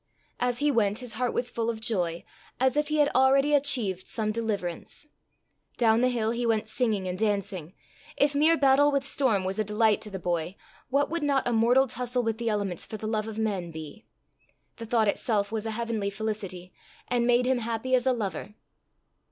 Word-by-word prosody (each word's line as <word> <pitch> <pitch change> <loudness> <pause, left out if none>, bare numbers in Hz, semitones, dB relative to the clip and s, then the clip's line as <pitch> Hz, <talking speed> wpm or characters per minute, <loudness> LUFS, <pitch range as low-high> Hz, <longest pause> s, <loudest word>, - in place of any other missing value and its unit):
As 245 -1 0
he 290 +3 +2
went 210 -5 +1
his 250 -2 -7
heart 245 +2 -1
was 245 - -1
full 230 0 -1
of 225 -1 -3
joy, 175 -7 -2 0.4
as 260 +1 +2
if 295 0 +1
he 305 - -1
had 295 -1 +4
already 275 +3 +4
achieved 240 -10 +1
some 215 -1 -1
deliverance. 210 - -4 0.7
Down 225 -1 +3
the 255 - +3
hill 225 -3 0
he 235 +1 -2
went 225 -2 +1
singing 220 -5 0
and 180 +1 -4
dancing. 195 -5 -1 0.4
If 285 0 +3
mere 310 +3 +4
battle 280 +1 +4
with 280 -1 0
storm 250 -9 +1
was 190 +2 -3
a - - +3
delight 210 +1 +2
to 215 - -7
the 195 - -5
boy, 175 0 -2 0.3
what 280 +3 +1
would 335 0 -1
not 280 -3 +1
a 240 - +1
mortal 240 +4 +4
tussle 250 0 -2
with 225 0 -2
the 230 -1 -1
elements 200 -5 -2
for 215 - -6
the 215 - -7
love 215 0 -1
of 220 -1 -6
men 200 -6 -1
be? 160 +6 -10 0.7
The 230 - -7
thought 225 -1 +2
itself 205 -1 0
was 225 0 -3
a - - -2
heavenly 230 -4 -2
felicity, 200 -4 -5 0.3
and 240 -1 +1
made 245 0 +4
him 255 -1 +2
"happy 230 +2 -3
as 255 0 +3
a - - +5
lover." 210 -3 -4
225 Hz, 200 wpm, -27 LUFS, 205-255 Hz, 0.7 s, a